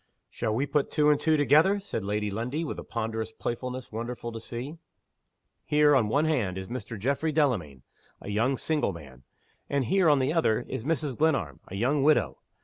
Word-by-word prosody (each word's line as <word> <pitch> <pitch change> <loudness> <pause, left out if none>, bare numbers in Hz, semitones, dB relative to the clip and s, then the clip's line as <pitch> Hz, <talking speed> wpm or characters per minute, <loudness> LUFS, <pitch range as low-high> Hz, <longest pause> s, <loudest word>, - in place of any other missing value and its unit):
"Shall 110 -2 -2
we 135 +5 +1
put 145 0 0
two 150 -1 +3
and 145 - +2
two 160 0 +2
together?" 155 +8 +4
said 195 - -4
Lady 105 +1 -1
Lundie, 125 +10 -2
with - - -5
a - - -6
ponderous 110 -1 -3
playfulness 125 +2 -5
wonderful 120 +1 -5
to 115 - -6
see. 125 +8 -7 0.8
"Here, 150 0 +4
on 125 -5 +4
the - - -3
one 145 +5 +3
hand, 115 - 0
is 95 0 -5
Mr. 115 -2 -6
Geoffrey 140 +8 0
Delamayn 105 - 0 0.4
a - - -9
young 115 +6 +1
single 150 -10 0
man. 70 -6 -12 0.5
And 140 -2 0
here, 185 - +3
on 145 - +5
the 135 +3 +1
other, 155 -10 +2
is - - -4
Mrs. 150 -2 -1
Glenarm 110 - 0
a 95 - -8
young 130 +8 +1
widow. 150 +2 +2
130 Hz, 195 wpm, -27 LUFS, 110-150 Hz, 0.8 s, on